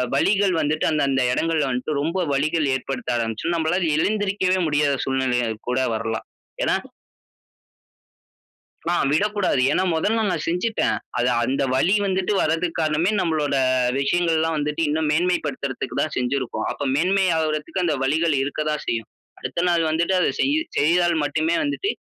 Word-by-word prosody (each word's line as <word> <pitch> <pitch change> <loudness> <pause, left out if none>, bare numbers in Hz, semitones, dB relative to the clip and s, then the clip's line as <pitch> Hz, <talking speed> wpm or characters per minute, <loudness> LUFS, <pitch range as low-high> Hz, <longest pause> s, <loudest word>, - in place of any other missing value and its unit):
வலிகள் 195 +4 +2
வந்துட்டு, 155 +1 0
அந்த, 155 -1 +1
அந்த 135 -1 +1
இடங்கள்ல 160 -1 0
வன்ட்டு 135 +4 -2
ரொம்ப 165 +5 -1 0.2
வலிகள் 155 +3 +1
ஏற்படுத்த 130 -2 -4
ஆரம்பிச்சுரும். 115 +9 -2
நம்மளால 165 +1 0
எழுந்திரிக்கவே 200 0 +1
முடியாத 145 -1 +2
சூழ்நிலையாய் 125 -4 0
கூட 125 +1 +1 0.2
வரலாம். 110 0 -3 0.4
ஏன்னா - - +2 2.2
ஆ - - +2 0.2
விடக்கூடாது. 205 -3 +1
ஏன்னா 185 - +1
மொதல்ல 215 +8 +1
நான் 165 -4 -2
செஞ்சிட்டேன். 180 +7 0 0.2
அது 120 - +2 0.2
அந்த 135 +3 0
வலி 175 +9 +3
வந்துட்டு 190 +1 0
வர்றதுக்கு 165 +2 -1
காரணமே 155 +4 +1
நம்மளோட 155 -5 0 0.5
விஷயங்கள் 165 +4 +1
எல்லாம் 160 0 0
வந்துட்டு 150 +2 -1
இன்னும் 155 +1 0
மேன்மை 180 +3 +2
படுத்துறதுக்கு 135 -2 -4
தான் 155 - -3
செஞ்சிருக்கோம். 130 0 -2
அப்ப 145 - -4
மேன்மை 190 +5 +2
ஆவுறதுக்கு 155 +3 -1
அந்த 160 -3 +1
வலிகள் 160 +3 +1
இருக்க 145 +2 -3
தான் 150 - -3
செய்யும். 115 -2 -2 0.3
அடுத்த - - -3
நாள் 170 -1 +2
வந்துட்டு 170 +4 +1
அத - - +2
செய்யி 285 +3 +2 0.2
செய்தால் 170 +2 +3
மட்டுமே 160 +3 0
வந்துட்டு 290 +8 -1
160 Hz, 145 wpm, -22 LUFS, 140-180 Hz, 2.2 s, வலி